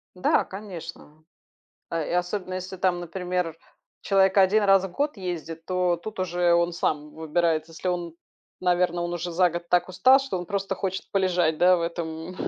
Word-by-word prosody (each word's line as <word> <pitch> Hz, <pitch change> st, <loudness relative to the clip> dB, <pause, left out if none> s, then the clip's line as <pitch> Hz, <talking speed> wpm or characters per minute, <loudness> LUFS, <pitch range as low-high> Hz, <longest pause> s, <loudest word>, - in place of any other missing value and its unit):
Да, 180 Hz, -, +2 dB
конечно. 175 Hz, -5 st, -9 dB, 0.7 s
А 165 Hz, -2 st, -1 dB
и -, -, -5 dB
особенно, 180 Hz, +1 st, -2 dB
если, 185 Hz, +1 st, -6 dB
там, 180 Hz, -1 st, +1 dB
например, 180 Hz, -1 st, -3 dB, 0.4 s
человек 195 Hz, 0 st, +3 dB
1 195 Hz, +3 st, +5 dB
раз 195 Hz, -1 st, +5 dB
в 190 Hz, -, -5 dB
год 285 Hz, +3 st, -2 dB
ездит, 165 Hz, -3 st, -5 dB
то 180 Hz, -1 st, +1 dB
тут 210 Hz, +4 st, -8 dB
уже 175 Hz, -1 st, +2 dB
он 170 Hz, 0 st, +2 dB
сам 150 Hz, -3 st, -2 dB
выбирает. 160 Hz, 0 st, 0 dB
Если 165 Hz, +3 st, -6 dB
он 175 Hz, -2 st, -2 dB, 0.5 s
наверно, 175 Hz, -1 st, +1 dB
он 175 Hz, -, -3 dB
уже 175 Hz, 0 st, -4 dB
за 180 Hz, +1 st, +3 dB
год 170 Hz, +1 st, -6 dB
так 180 Hz, +1 st, +2 dB
устал, 210 Hz, +9 st, +6 dB
что 270 Hz, -9 st, -3 dB
он 175 Hz, -, -6 dB
просто 195 Hz, 0 st, -2 dB
хочет 190 Hz, 0 st, -4 dB
полежать, 180 Hz, -5 st, +1 dB
да 180 Hz, +1 st, +6 dB
в 170 Hz, -, -2 dB
этом 170 Hz, 0 st, -4 dB
180 Hz, 180 wpm, -25 LUFS, 170-190 Hz, 0.7 s, устал